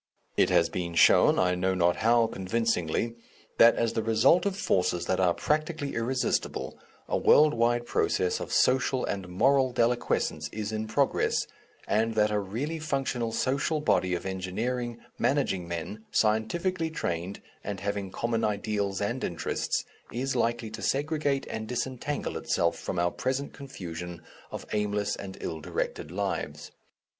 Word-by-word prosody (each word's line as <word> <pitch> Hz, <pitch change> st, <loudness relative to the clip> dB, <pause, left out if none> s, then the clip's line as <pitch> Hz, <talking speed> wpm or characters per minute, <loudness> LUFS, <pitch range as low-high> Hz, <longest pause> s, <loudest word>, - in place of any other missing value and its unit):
It -, -, +4 dB
has -, -, +4 dB
been 85 Hz, -2 st, -4 dB
shown -, -, +6 dB
I 90 Hz, -1 st, +3 dB
know 95 Hz, +1 st, 0 dB
not 85 Hz, -1 st, +2 dB
how 115 Hz, +1 st, +4 dB
convincingly 110 Hz, 0 st, -1 dB, 0.5 s
that 115 Hz, 0 st, +8 dB
as 115 Hz, -1 st, 0 dB
the 110 Hz, -, 0 dB
result 115 Hz, -, +4 dB
of 195 Hz, -1 st, -2 dB
forces 90 Hz, -, +1 dB
that 95 Hz, -, 0 dB
are 90 Hz, -2 st, +3 dB
practically 155 Hz, -1 st, -1 dB
irresistible, 125 Hz, +3 st, -1 dB, 0.3 s
a -, -, 0 dB
world 150 Hz, 0 st, +6 dB
wide 120 Hz, +1 st, +1 dB
process 90 Hz, -5 st, +1 dB
of -, -, -6 dB
social 130 Hz, 0 st, +3 dB
and 95 Hz, -3 st, -4 dB
moral 130 Hz, +8 st, +3 dB
deliquescence 120 Hz, -10 st, 0 dB
is 105 Hz, 0 st, -4 dB
in 110 Hz, 0 st, -3 dB
progress, 135 Hz, +5 st, +1 dB, 0.4 s
and 110 Hz, +1 st, +1 dB
that 105 Hz, -1 st, +3 dB
a 105 Hz, -, +1 dB
really 125 Hz, +12 st, -3 dB
functional 135 Hz, -6 st, -1 dB
social 135 Hz, +6 st, 0 dB
body 95 Hz, -11 st, +2 dB
of 85 Hz, -, -5 dB
engineering, 115 Hz, +6 st, -3 dB, 0.2 s
managing 115 Hz, -11 st, +1 dB
men, 85 Hz, +6 st, -5 dB
scientifically 160 Hz, -, +1 dB
trained, 90 Hz, -, -3 dB, 0.2 s
and 100 Hz, -2 st, -4 dB
having 100 Hz, -1 st, -2 dB
common 115 Hz, +3 st, -1 dB
ideals 100 Hz, -1 st, -1 dB
and 120 Hz, +5 st, -2 dB
interests, 85 Hz, -, -2 dB, 0.3 s
is 130 Hz, +2 st, -2 dB
likely 115 Hz, -2 st, 0 dB
to 110 Hz, 0 st, -7 dB
segregate 145 Hz, 0 st, 0 dB
and 110 Hz, 0 st, -5 dB
disentangle 130 Hz, +4 st, -3 dB
itself 85 Hz, -1 st, +1 dB
from 90 Hz, -, -5 dB
our 85 Hz, 0 st, +2 dB
present 135 Hz, +2 st, -2 dB
confusion 90 Hz, -, -7 dB, 0.3 s
of -, -, -6 dB
aimless 105 Hz, -1 st, 0 dB
and 95 Hz, -1 st, -8 dB
ill 80 Hz, -1 st, -4 dB
directed 75 Hz, -, -3 dB
lives. 95 Hz, +2 st, -3 dB
110 Hz, 150 wpm, -28 LUFS, 95-130 Hz, 0.5 s, that